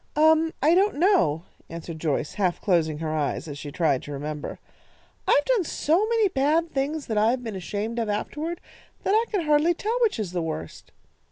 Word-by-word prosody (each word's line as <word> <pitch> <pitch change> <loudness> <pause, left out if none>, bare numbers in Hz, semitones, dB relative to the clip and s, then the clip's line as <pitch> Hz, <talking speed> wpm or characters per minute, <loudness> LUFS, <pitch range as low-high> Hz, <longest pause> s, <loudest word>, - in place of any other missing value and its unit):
"Um, 315 +1 +4
I 310 +3 +5
don't 395 +4 +3
know," 290 - +3 0.3
answered 165 -1 -7
Joyce, 150 -2 -1
half 185 -4 0
closing 165 -6 +1
her 155 0 -3
eyes 150 +2 -2
as 145 -1 -7
she 145 - -7
tried 145 -5 +1
to 145 - -9
remember. 150 +1 -5 0.7
"I've 290 - +4
done - - +2
so 335 +6 +1
many 455 -2 +3
bad 320 +1 +1
things 285 +2 -2
that 220 -2 0
I 215 +2 +4
have 250 +1 -1
been 225 -4 -5
ashamed 205 +6 -3
of 225 -2 -1
afterward, 300 +11 -3 0.4
that 390 - +1
I 445 +2 +4
can 405 -4 0
hardly 300 +3 +3
tell 450 +7 -1
which 450 - +2
is 205 -6 -3
the 180 -1 -2
worst. 155 - -6
235 Hz, 195 wpm, -25 LUFS, -, 0.7 s, I